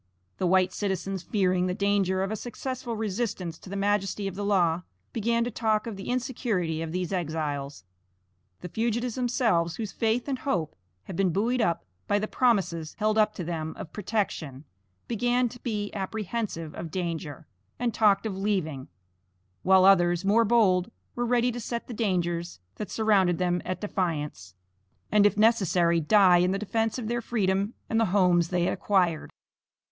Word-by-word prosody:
The 185 Hz, -, +1 dB
white 185 Hz, 0 st, +3 dB
citizens 195 Hz, -1 st, -2 dB
fearing 185 Hz, -1 st, +1 dB
the 180 Hz, -, -1 dB
danger 200 Hz, -2 st, +1 dB
of 195 Hz, -, -2 dB
a -, -, -1 dB
successful 245 Hz, +1 st, -5 dB
resistance 205 Hz, -6 st, -3 dB
to -, -, -12 dB
the 200 Hz, -, -5 dB
majesty 200 Hz, 0 st, 0 dB
of 195 Hz, -, -4 dB
the 205 Hz, +2 st, -4 dB
law, 180 Hz, -4 st, +2 dB, 0.3 s
began 230 Hz, +1 st, +1 dB
to 240 Hz, -, -3 dB
talk 220 Hz, -1 st, 0 dB
of 230 Hz, -3 st, -5 dB
the 195 Hz, -, -7 dB
insecurity 230 Hz, -, -1 dB
of 165 Hz, -1 st, -4 dB
these 180 Hz, +2 st, -2 dB
exiles. 150 Hz, -, -3 dB, 0.8 s
The 180 Hz, -, -6 dB
fugitives 235 Hz, +4 st, -1 dB
themselves, 225 Hz, -9 st, +1 dB
whose 215 Hz, -3 st, -4 dB
faith 230 Hz, +3 st, 0 dB
and 270 Hz, -2 st, -2 dB
hope 175 Hz, -, -2 dB, 0.3 s
had 180 Hz, -, -8 dB
been 190 Hz, +1 st, +2 dB
buoyed 230 Hz, +8 st, +1 dB
up 170 Hz, -, 0 dB, 0.2 s
by 205 Hz, -, +2 dB
the 210 Hz, +1 st, -1 dB
promises 190 Hz, -12 st, +1 dB
held 215 Hz, 0 st, +1 dB
up 215 Hz, 0 st, +3 dB
to 180 Hz, -, -4 dB
them 160 Hz, -1 st, -4 dB
of 160 Hz, -, -8 dB
protection, 180 Hz, -, -3 dB, 0.4 s
began 245 Hz, +2 st, +1 dB
to 245 Hz, -, -12 dB
be 210 Hz, -4 st, -3 dB
apprehensive 200 Hz, -4 st, -4 dB
of 165 Hz, -, -6 dB
danger, 165 Hz, -5 st, -4 dB, 0.3 s
and 240 Hz, -2 st, -1 dB
talked 210 Hz, -1 st, +3 dB
of 210 Hz, -3 st, -2 dB
leaving, 185 Hz, -9 st, -2 dB, 0.7 s
while 190 Hz, 0 st, +5 dB
others, 175 Hz, -2 st, +4 dB
more 225 Hz, +4 st, +4 dB
bold, 200 Hz, -4 st, +3 dB, 0.2 s
were 240 Hz, 0 st, -2 dB
ready 245 Hz, 0 st, +2 dB
to 240 Hz, -, -5 dB
set 235 Hz, 0 st, -4 dB
the 245 Hz, -, -7 dB
dangers 175 Hz, -, -1 dB, 0.2 s
that 210 Hz, -, -5 dB
surrounded 195 Hz, -6 st, +2 dB
them 180 Hz, -1 st, 0 dB
at 185 Hz, -, -4 dB
defiance, 150 Hz, -, -3 dB, 0.6 s
and 210 Hz, -1 st, +6 dB
if 205 Hz, -, -2 dB
necessary, 185 Hz, -6 st, +3 dB
die 185 Hz, +1 st, +6 dB
in 180 Hz, +1 st, +3 dB
the 195 Hz, -, 0 dB
defence 225 Hz, +3 st, -1 dB
of 235 Hz, -4 st, -4 dB
their 240 Hz, +1 st, -1 dB
freedom 200 Hz, -2 st, 0 dB
and 225 Hz, -, +1 dB
the 225 Hz, -, +4 dB
homes 180 Hz, -3 st, +3 dB
they 180 Hz, -1 st, +1 dB
had 175 Hz, -, +1 dB
acquired. 180 Hz, -6 st, +1 dB
195 Hz, 170 wpm, -27 LUFS, 175-225 Hz, 0.8 s, and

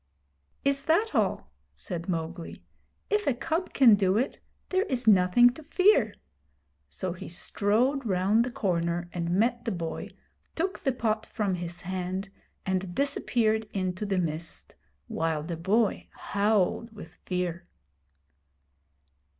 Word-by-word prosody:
'Is 275 Hz, 0 st, +1 dB
that 385 Hz, +8 st, +2 dB
all?' -, -, 0 dB, 0.2 s
said 175 Hz, -2 st, -6 dB
Mowgli. 165 Hz, 0 st, -4 dB, 0.5 s
'If 420 Hz, 0 st, +1 dB
a 275 Hz, -, +3 dB
cub 320 Hz, +8 st, -2 dB
can 250 Hz, -5 st, +7 dB
do 195 Hz, -1 st, +3 dB
it, 255 Hz, +4 st, -1 dB, 0.3 s
there 375 Hz, 0 st, +2 dB
is 250 Hz, -2 st, -2 dB
nothing 210 Hz, +4 st, +6 dB
to 265 Hz, -, -12 dB
fear'; 310 Hz, -, +3 dB, 0.7 s
so 180 Hz, -, -4 dB
he 180 Hz, -, -9 dB
strode 225 Hz, +10 st, +1 dB
round 200 Hz, +2 st, +2 dB
the 250 Hz, -, -3 dB
corner 175 Hz, -5 st, -1 dB
and 170 Hz, -1 st, -2 dB
met 230 Hz, +6 st, +1 dB
the 230 Hz, -, -2 dB
boy, 170 Hz, -4 st, -4 dB, 0.5 s
took 370 Hz, +4 st, -1 dB
the 270 Hz, -, +1 dB
pot 220 Hz, -3 st, -1 dB
from 205 Hz, -4 st, -1 dB
his 175 Hz, 0 st, -5 dB
hand, 185 Hz, +2 st, -3 dB, 0.4 s
and 185 Hz, -1 st, -2 dB
disappeared 220 Hz, -6 st, +1 dB
into 185 Hz, +1 st, -2 dB
the 195 Hz, -1 st, 0 dB
mist 165 Hz, -2 st, -4 dB, 0.3 s
while 160 Hz, -2 st, -1 dB
the 170 Hz, +2 st, -4 dB
boy 200 Hz, +6 st, +1 dB
howled 205 Hz, +2 st, 0 dB
with 165 Hz, -5 st, -10 dB
fear. 180 Hz, -1 st, -2 dB
200 Hz, 135 wpm, -28 LUFS, 180-240 Hz, 0.7 s, can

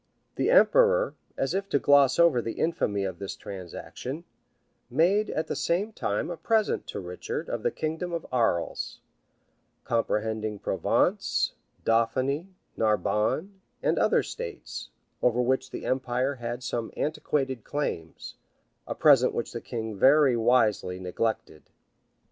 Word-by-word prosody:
[*] -, -, -46 dB
The -, -, +1 dB
emperor, -, -, +5 dB, 0.2 s
as 135 Hz, +4 st, 0 dB
if 195 Hz, +1 st, -2 dB
to 145 Hz, -, +3 dB
gloss 140 Hz, -1 st, +5 dB
over 170 Hz, -8 st, +5 dB
the 115 Hz, -, -4 dB
infamy 105 Hz, -12 st, 0 dB
of 95 Hz, -3 st, -4 dB
this 100 Hz, -1 st, -5 dB
transaction, 100 Hz, -, -7 dB, 0.7 s
made 180 Hz, -, +3 dB
at 155 Hz, -, -1 dB
the -, -, -3 dB
same 175 Hz, +9 st, 0 dB
time 105 Hz, -, -2 dB
a 170 Hz, -, -5 dB
present 220 Hz, +5 st, +1 dB
to -, -, -5 dB
Richard 90 Hz, -1 st, -5 dB
of -, -, -3 dB
the -, -, +1 dB
kingdom 160 Hz, +3 st, -3 dB
of 170 Hz, -1 st, -3 dB
Arles, 115 Hz, -9 st, 0 dB, 0.8 s
comprehending 110 Hz, -2 st, -1 dB
Provence, -, -, +1 dB, 0.3 s
Dauphiny, 130 Hz, +8 st, +1 dB, 0.3 s
Narbonne, 110 Hz, -, 0 dB, 0.2 s
and -, -, +2 dB
other -, -, +3 dB
states, 475 Hz, -2 st, -7 dB, 0.3 s
over 125 Hz, 0 st, +2 dB
which 130 Hz, +1 st, +1 dB
the -, -, -7 dB
empire 130 Hz, +1 st, 0 dB
had 120 Hz, -1 st, -5 dB
some 120 Hz, -1 st, -3 dB
antiquated 135 Hz, -5 st, -1 dB
claims; 85 Hz, -, -4 dB, 0.5 s
a -, -, -3 dB
present 140 Hz, -5 st, +5 dB
which 120 Hz, -, -2 dB
the 115 Hz, -, -5 dB
king 110 Hz, -3 st, -5 dB
very 135 Hz, +4 st, +5 dB
wisely 110 Hz, -6 st, +2 dB
neglected. 90 Hz, -3 st, -3 dB
130 Hz, 135 wpm, -27 LUFS, 110-155 Hz, 0.8 s, emperor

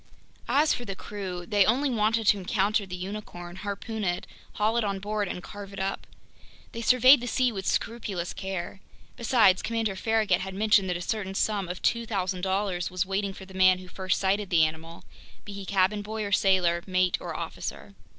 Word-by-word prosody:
As 300 Hz, +2 st, +4 dB
for 245 Hz, -, -4 dB
the 195 Hz, -4 st, -5 dB
crew, 185 Hz, -3 st, -6 dB
they 205 Hz, -1 st, +4 dB
only 260 Hz, +7 st, +2 dB
wanted 225 Hz, 0 st, +1 dB
to 205 Hz, 0 st, +4 dB
encounter 200 Hz, +2 st, 0 dB
the 180 Hz, -, -5 dB
unicorn, 180 Hz, -2 st, -7 dB
harpoon 210 Hz, +2 st, -5 dB
it, 175 Hz, -2 st, -1 dB, 0.3 s
haul 215 Hz, +2 st, +1 dB
it 235 Hz, -, +2 dB
on 200 Hz, -2 st, -1 dB
board, 205 Hz, +1 st, -2 dB
and 180 Hz, -, -5 dB
carve 200 Hz, -1 st, -9 dB
it 195 Hz, -, -7 dB
up. 195 Hz, 0 st, -3 dB, 0.6 s
They 230 Hz, -, -6 dB
surveyed 255 Hz, +3 st, +6 dB
the 245 Hz, -, -4 dB
sea 250 Hz, 0 st, +2 dB
with 195 Hz, -3 st, -5 dB
scrupulous 200 Hz, -7 st, -2 dB
care. 190 Hz, -1 st, -5 dB, 0.4 s
Besides, 225 Hz, -6 st, +4 dB
Commander 225 Hz, -3 st, -1 dB
Farragut 215 Hz, -3 st, +1 dB
had 190 Hz, 0 st, -5 dB
mentioned 205 Hz, -2 st, +3 dB
that 180 Hz, -, 0 dB
a -, -, -7 dB
certain 195 Hz, -3 st, -3 dB
sum 200 Hz, -3 st, 0 dB
of 180 Hz, -, -6 dB
$2,000.00 190 Hz, -4 st, -1 dB
was 185 Hz, +1 st, -1 dB
waiting 195 Hz, +1 st, -1 dB
for 190 Hz, -, -10 dB
the 190 Hz, -, -14 dB
man 185 Hz, -1 st, +5 dB
who 185 Hz, 0 st, -11 dB
first 185 Hz, +1 st, -1 dB
sighted 195 Hz, +1 st, 0 dB
the 165 Hz, -4 st, +5 dB
animal, 160 Hz, +2 st, -6 dB, 0.4 s
be 205 Hz, -, -8 dB
he 200 Hz, -1 st, -7 dB
cabin 195 Hz, +1 st, +2 dB
boy 215 Hz, +1 st, -4 dB
or 200 Hz, -, -4 dB
sailor, 185 Hz, -3 st, +3 dB
mate 185 Hz, -1 st, +1 dB
or -, -, -5 dB
officer. 100 Hz, -, -6 dB
195 Hz, 190 wpm, -27 LUFS, 185-215 Hz, 0.6 s, surveyed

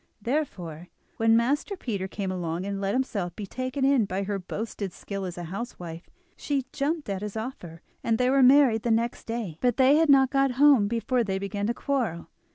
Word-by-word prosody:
Therefore, 195 Hz, -, -3 dB, 0.3 s
when 225 Hz, 0 st, +4 dB
Master 285 Hz, -, 0 dB
Peter 200 Hz, -, -3 dB
came 195 Hz, -1 st, -4 dB
along, 175 Hz, -1 st, -3 dB
and 200 Hz, 0 st, -3 dB
let 200 Hz, +3 st, 0 dB
himself 200 Hz, -9 st, -2 dB
be 210 Hz, -, -5 dB
taken 255 Hz, +5 st, -2 dB
in 270 Hz, -5 st, +4 dB
by 195 Hz, 0 st, -2 dB
her 200 Hz, 0 st, -2 dB
boasted 200 Hz, 0 st, -5 dB
skill 195 Hz, -1 st, -5 dB
as 180 Hz, -1 st, -6 dB
a 175 Hz, -, -5 dB
housewife, 175 Hz, -3 st, -7 dB, 0.3 s
she 275 Hz, -3 st, -2 dB
jumped 300 Hz, +2 st, -1 dB
at 195 Hz, -1 st, -3 dB
his 210 Hz, +1 st, -5 dB
offer, 180 Hz, -9 st, -7 dB, 0.2 s
and 225 Hz, -1 st, +1 dB
they 250 Hz, +1 st, +2 dB
were 275 Hz, 0 st, +4 dB
married 255 Hz, -3 st, +6 dB
the 235 Hz, -, -2 dB
next 230 Hz, +1 st, 0 dB
day. 225 Hz, -9 st, -4 dB
But 245 Hz, -2 st, +2 dB
they 270 Hz, +2 st, +5 dB
had 320 Hz, -1 st, +3 dB
not 270 Hz, -2 st, +6 dB
got 275 Hz, -1 st, +2 dB
home 270 Hz, -5 st, +5 dB
before 235 Hz, +2 st, 0 dB
they 190 Hz, -3 st, -2 dB
began 200 Hz, +1 st, -3 dB
to 235 Hz, -, -1 dB
quarrel. 235 Hz, -12 st, -2 dB
225 Hz, 200 wpm, -26 LUFS, 195-265 Hz, 0.3 s, married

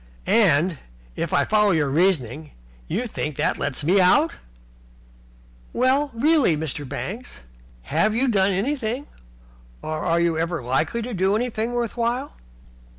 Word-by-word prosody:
"And, 175 Hz, -, +3 dB, 0.4 s
if -, -, -3 dB
I -, -, +2 dB
follow 210 Hz, -1 st, +3 dB
your 160 Hz, -6 st, +2 dB
reasoning, 150 Hz, -, 0 dB, 0.3 s
you 215 Hz, +9 st, -2 dB
think 155 Hz, -, -4 dB
that -, -, +1 dB
that -, -, -11 dB
lets 145 Hz, +1 st, -2 dB
me 180 Hz, +6 st, +3 dB
out?" 290 Hz, -, +3 dB, 1.4 s
"Well, 265 Hz, +4 st, +2 dB
really, 280 Hz, -, +3 dB
Mr. 145 Hz, -3 st, -5 dB
Banks, 210 Hz, -, -6 dB, 0.4 s
have 215 Hz, -, +1 dB
you 260 Hz, +3 st, +1 dB
done 200 Hz, -5 st, +3 dB
anything, 245 Hz, +5 st, -2 dB, 0.8 s
or 155 Hz, 0 st, -3 dB
are 170 Hz, -1 st, +1 dB
you 170 Hz, 0 st, +2 dB
likely 160 Hz, -, -1 dB
ever 230 Hz, -, -5 dB
to -, -, -5 dB
do 190 Hz, +1 st, +1 dB
anything 230 Hz, 0 st, -2 dB
worth 240 Hz, -1 st, -2 dB
while?" 240 Hz, +4 st, -1 dB
200 Hz, 145 wpm, -23 LUFS, 160-240 Hz, 1.4 s, And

